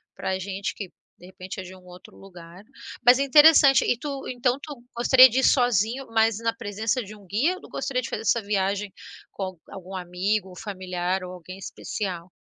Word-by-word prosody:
para - - -3
a 190 - -2
gente 195 +1 -4
que 200 -3 -7 0.3
de 180 - -14
repente 185 +1 -9
é - - -9
de 185 +1 -11
um 185 - -18
outro 180 0 -15
lugar. 180 -1 -14 0.4
Mas 245 +2 +7
é - - +2
interessante 285 -1 +6
e 245 - +1
tu, 280 -2 -6
então, 245 0 0
tu 285 -6 -10
gostaria 255 +2 +7
de 250 +3 0
ir - - 0
sozinho, 245 +1 +2
mas 225 -1 +2
na 230 0 -1
presença 220 +1 -3
de 210 +1 -11
um 205 - -17
guia, 275 - 0
gostaria 260 -3 -2
de - - -6
fazer - - -4
essa 235 +1 +2
viagem 200 0 -1 0.4
com 195 - -6
al 185 -3 -6
algum 190 0 -9
amigo 185 +2 -2
familiar 185 -2 -3
ou 180 - -7
alguém 185 +1 -11
especial? 185 -2 -6
205 Hz, 200 wpm, -24 LUFS, 185-245 Hz, 0.4 s, Mas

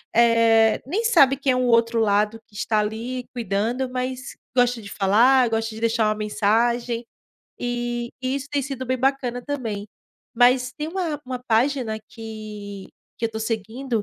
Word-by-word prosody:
eh, 230 -1 +5
nem 385 - -1
sabe 275 - +5
quem 275 -1 +1
é - - 0
o 255 - +1
outro 230 -1 +3
lado 210 +1 +2
que 205 - -22
está 215 +1 0
ali 230 +4 -3
cuidando, 235 +3 -1
mas 255 +1 -4 0.2
gosta 245 -2 +2
de 200 - -10
falar, 235 +6 +4
gosta 225 0 -1
de 220 - -8
deixar 230 -1 +2
uma 215 - +1
mensagem, 230 +3 0 0.5
e 240 0 -3
e 260 +1 -1
isso 280 +1 -6
tem 285 -1 0
sido 265 -1 -5
bem 255 +1 0
bacana 255 -2 0
também. 225 -8 -4 0.5
Mas 250 +1 +4
tem 300 +3 -5
uma 330 -4 -3
uma 255 -1 -5
página 235 -1 +1
que 215 -3 -8 0.3
que 230 - 0
eu - - -7
tô 220 - -5
seguindo, 225 +2 -2
235 Hz, 165 wpm, -23 LUFS, 220-255 Hz, 0.5 s, eh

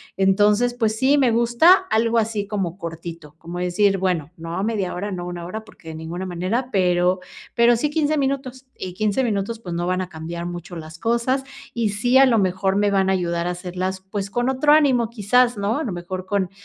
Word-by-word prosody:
Entonces, 205 +5 +3
pues 220 -3 0
sí, 270 +5 +3
me 260 -4 +3
gusta 235 +9 +5 0.2
algo 230 +1 +2
así 215 -2 -1
como 195 -4 -3
cortito, 165 -3 -8
como 170 +1 -8
decir, 190 +3 +2
bueno, 175 -5 -1
no 165 +1 -6
a 190 - -2
media 210 -4 -1
hora, 200 +3 -4
no 180 -2 -4
a - - -6
una 175 -1 -6
hora, 220 +5 -6
porque 165 - -18
de 160 - -7
ninguna 165 +4 -5
manera, 185 +9 -2
pero 180 -1 +2 0.4
pero 235 0 +5
sí 265 +6 0
15 305 0 +1
minutos, 265 -1 -3
y 185 -1 -6
15 215 +6 0
minutos, 220 0 -2
pues, 180 -6 -7
no 175 +1 -2
van 185 0 0
a 185 - -5
cambiar 170 +1 -6
mucho 175 0 -7
las 160 0 -9
cosas, 235 +5 0 0.3
y 230 -3 0
sí, 245 +6 +2
a 270 - +7
lo 235 -3 +3
mejor 190 0 +1
me 205 0 +2
van 190 -1 +2
a - - +3
ayudar 170 -2 -1
a - - 0
hacerlas, 185 +1 -4
pues, 200 -1 -3
con 240 +4 -1
otro 270 +3 +3
ánimo, 265 -7 +3
quizás, 240 +2 +2
¿no?, 205 +7 0
a - - -2
lo 230 - -3
mejor 185 +1 -6
con, 195 -2 0
200 Hz, 220 wpm, -22 LUFS, 180-235 Hz, 0.4 s, a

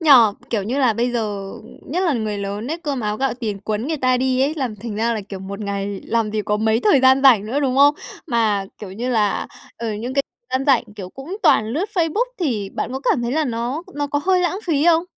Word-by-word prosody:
Nhỉ? 320 -3 +2 0.4
Kiểu, 215 -4 0
như 245 +8 -2
là 255 -4 +4
bây 235 +3 0
giờ 205 -4 -3 0.4
nhất 340 +6 -1
là 335 -5 +2
người 215 -4 -2
lớn 200 +3 -4
ấy, 330 - -2
cơm 290 -6 -3
áo 210 -1 -1
gạo 265 -1 0
tiền 220 -5 -4
quấn 215 +4 -2
người 320 - -1
ta 255 -2 +2
đi 255 0 +1
ấy, 285 +4 +2
làm 255 -8 -3
thành 215 0 -6
ra 230 +2 +1
là, 215 - -2
kiểu, 195 - -6
một 200 +2 -7
ngày 200 -1 -3
làm 225 -2 0
gì 215 0 -1
có 210 0 0
mấy 220 +1 +1
thời 290 -8 +4
gian 260 +1 +5
rảnh 230 -7 +6
nữa, 265 +6 -1
đúng 265 -2 0
không? 285 +1 +6 0.3
Mà, 220 -7 +1
kiểu 195 -3 -8
như 235 +6 -4
là, 215 -4 +1 0.3
ờ, 230 -2 -3
những 240 +5 -5
c - - -11 0.4
gian 260 +1 +1
rảnh, 265 -5 +4
kiểu, 190 -3 -6
cũng 295 - -7
toàn 220 - +4
lướt 300 - -1
Facebook, 350 +6 +1 0.2
thì 220 - -1
bạn - - -3
có 265 - -3
cảm 240 - +1
thấy 235 +1 -1
là 315 +1 +1
nó 245 +5 -2
nó 290 0 -1
có 290 0 -1
hơi 370 0 +3
lãng 360 +1 0
phí 300 -2 +2
không? 335 0 +4
240 Hz, 255 wpm, -21 LUFS, 215-285 Hz, 0.4 s, rảnh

